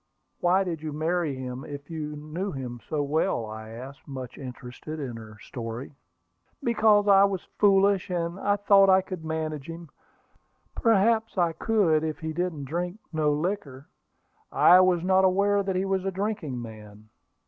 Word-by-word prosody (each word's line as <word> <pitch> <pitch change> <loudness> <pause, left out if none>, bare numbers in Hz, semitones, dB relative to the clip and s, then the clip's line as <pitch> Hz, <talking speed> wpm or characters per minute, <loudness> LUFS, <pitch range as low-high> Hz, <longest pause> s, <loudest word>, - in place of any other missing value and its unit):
"Why 185 +2 +3
did 170 -5 -4
you 155 -1 -4
marry 160 -1 -1
him 130 0 -6
if 145 +1 -9
you 150 -2 -4
knew 155 +7 -5
him 125 -3 -6
so 150 -2 0
well?" 150 -4 0
I 110 0 -8
asked, 130 +4 -10
much 130 -3 -7
interested 130 +4 -8
in 130 -5 -5
her 110 -2 -11
story. 115 +5 -7 0.7
"Because 215 -3 +3
I 195 -1 +7
was 195 -3 -2 0.2
foolish, 200 -1 +4
and 175 0 -2 0.3
thought 195 -1 +6
I 190 0 +6
could 185 -4 -7
manage 160 -2 -4
him. 165 -1 -8 0.8
Perhaps 225 -1 +2
I 170 -2 +2
could, 170 -7 +2
if 155 -1 -2
he 160 0 -5
didn't 165 -4 -3
drink 175 +6 -3 0.2
no 155 -1 +2
liquor." 145 -4 -3 0.6
"I 180 - +7
was 185 -2 +3
not 190 +1 +3
aware 200 +2 +3
that 195 -1 -2
he 185 +1 0
was 195 -1 0
a 195 - -1
drinking 190 - -3
man." 110 -2 -11
160 Hz, 160 wpm, -26 LUFS, 140-190 Hz, 0.8 s, I